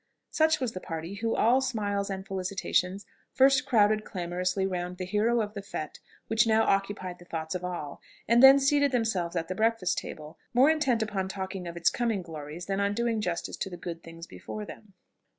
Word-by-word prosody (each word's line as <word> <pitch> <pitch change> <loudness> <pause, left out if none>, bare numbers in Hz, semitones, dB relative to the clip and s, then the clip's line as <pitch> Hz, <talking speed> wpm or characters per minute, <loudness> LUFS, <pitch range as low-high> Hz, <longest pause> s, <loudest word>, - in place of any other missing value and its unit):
Such 315 0 +3
was 255 -4 -1
the 185 - -6
party 165 +1 -6
who, 225 +2 -1
all 250 +4 +4
smiles 205 -6 -1
and 190 -1 -4
felicitations, 190 0 -1 0.3
first 270 +1 +4
crowded 215 -2 +3
clamorously 180 +1 -2
round 180 -1 -3
the 185 - -4
hero 220 +5 +1
of 210 -1 -4
the 200 - -5
fête 155 -6 -6 0.3
which 220 +1 +2
now 220 0 +4
occupied 195 -2 -1
the 175 - -14
thoughts 160 -2 -4
of 180 -1 -4
all, 175 -5 -5 0.3
and 235 +2 +5
then 270 +1 +10
seated 285 0 +3
themselves 220 -9 0
at 165 -1 -1
the 185 - -3
breakfast 220 -2 +1
table, 155 0 -9 0.2
more 265 +5 +6
intent 265 -8 +1
upon 195 -3 -2
talking 190 -1 -5
of 170 0 -7
its 170 - +3
coming 230 -6 -1
glories 160 +1 -8
than 195 0 -2
on 200 0 +1
doing 230 -1 0
justice 175 -4 -3
to 195 - -3
the 175 - -8
good 170 -1 -6
things 165 0 -10
before 210 +4 -7
them. 205 -2 -12
195 Hz, 200 wpm, -28 LUFS, 180-225 Hz, 0.3 s, then